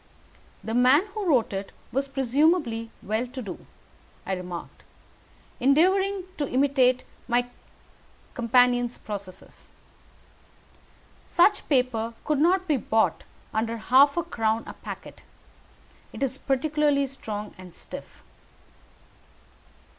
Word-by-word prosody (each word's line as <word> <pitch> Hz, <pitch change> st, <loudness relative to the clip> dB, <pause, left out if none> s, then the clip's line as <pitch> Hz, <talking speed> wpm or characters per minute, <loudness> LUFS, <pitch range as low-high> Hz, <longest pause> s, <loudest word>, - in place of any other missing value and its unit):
"The 225 Hz, -, -4 dB
man 255 Hz, -, +5 dB
who 420 Hz, -3 st, -3 dB
wrote 255 Hz, -10 st, +2 dB
it 195 Hz, 0 st, -4 dB, 0.2 s
was 275 Hz, +2 st, -1 dB
presumably 270 Hz, -3 st, +1 dB
well 220 Hz, +4 st, -1 dB
to 260 Hz, +2 st, -8 dB
do," 200 Hz, -8 st, -8 dB, 0.6 s
I 195 Hz, -, -2 dB
remarked, 180 Hz, -2 st, -7 dB, 0.8 s
endeavouring 375 Hz, +9 st, +3 dB, 0.2 s
to 290 Hz, -, -1 dB
imitate 255 Hz, -1 st, +3 dB, 0.2 s
my 245 Hz, 0 st, +1 dB, 0.8 s
companion's 245 Hz, 0 st, +3 dB
processes. 200 Hz, -3 st, -9 dB, 1.6 s
"Such 400 Hz, +4 st, +3 dB
paper 245 Hz, -4 st, +1 dB
could 300 Hz, -2 st, +1 dB
not 370 Hz, +4 st, +3 dB
be 300 Hz, -4 st, +2 dB
bought 220 Hz, -1 st, +1 dB, 0.3 s
under 225 Hz, +1 st, -1 dB
half 275 Hz, +6 st, +5 dB
a 345 Hz, -, +1 dB
crown 225 Hz, -3 st, -1 dB
a -, -, -8 dB
packet. -, -, -9 dB, 0.9 s
It -, -, -4 dB
is 265 Hz, 0 st, -2 dB
peculiarly 285 Hz, +1 st, +1 dB
strong 215 Hz, -6 st, -6 dB
and 180 Hz, -2 st, -12 dB
stiff." -, -, -11 dB
255 Hz, 110 wpm, -26 LUFS, 225-290 Hz, 1.6 s, man